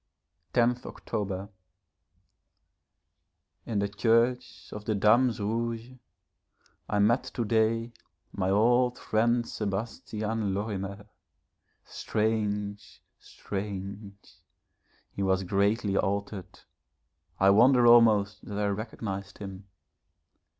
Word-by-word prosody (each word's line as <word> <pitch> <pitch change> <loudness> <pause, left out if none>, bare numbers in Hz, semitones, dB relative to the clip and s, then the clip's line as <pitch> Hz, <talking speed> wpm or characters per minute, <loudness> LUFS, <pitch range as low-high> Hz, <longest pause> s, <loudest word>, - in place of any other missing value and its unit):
10th 120 +1 +2
October. 100 -1 -4 2.2
In 110 - -2
the 100 0 +1
Church 115 +4 0
of 105 0 -8
the 110 - 0
Dames 115 +4 +3
Rouges, 115 +3 -3 0.9
I 105 - 0
met 110 +5 +3
to 120 - -3
day 115 +2 +1 0.4
my 95 -1 -1
old 120 +5 +3
friend 120 +2 +1
Sebastian 105 0 -3
Lorimer. 100 -1 -4 0.8
Strange! 105 -2 -2 0.2
Strange! 100 0 -7 0.7
He - - -6
was 95 0 +1
greatly 100 +2 +1
altered, 100 -1 -2 0.8
I 95 +1 +6
wonder 120 +4 +5
almost 110 -4 +5
that 100 - -6
I 105 - 0
recognised 100 -2 -5
him. 100 -1 -9
105 Hz, 90 wpm, -28 LUFS, 100-115 Hz, 2.2 s, I